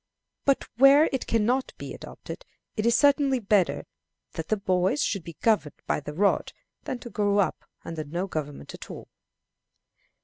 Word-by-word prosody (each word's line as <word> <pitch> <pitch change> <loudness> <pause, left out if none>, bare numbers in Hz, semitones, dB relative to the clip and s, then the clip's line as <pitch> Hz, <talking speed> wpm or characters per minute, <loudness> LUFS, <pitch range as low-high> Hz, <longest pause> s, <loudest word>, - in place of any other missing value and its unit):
But 275 -1 +2
where 275 +4 +7
it 265 - -2
can 225 -2 +2
not 255 +3 0
be - - -7
adopted, - - -9 0.3
it 220 +1 0
is 235 - +4
certainly 280 -1 +4
better 205 -5 +1 0.5
that 160 -1 -5
the 215 - +1
boys 190 +7 +1
should 195 -5 -1
be 165 -1 -10
governed 215 -10 +1
by - - 0
the 150 0 -8
rod 200 +4 +1 0.3
than 255 - -3
to 240 - -9
grow 205 -1 +1
up 200 - 0 0.2
under 165 -2 -4
no 170 +6 -3
government 150 -6 -5
at - - -10
all. - - -9
205 Hz, 170 wpm, -26 LUFS, 175-260 Hz, 0.5 s, where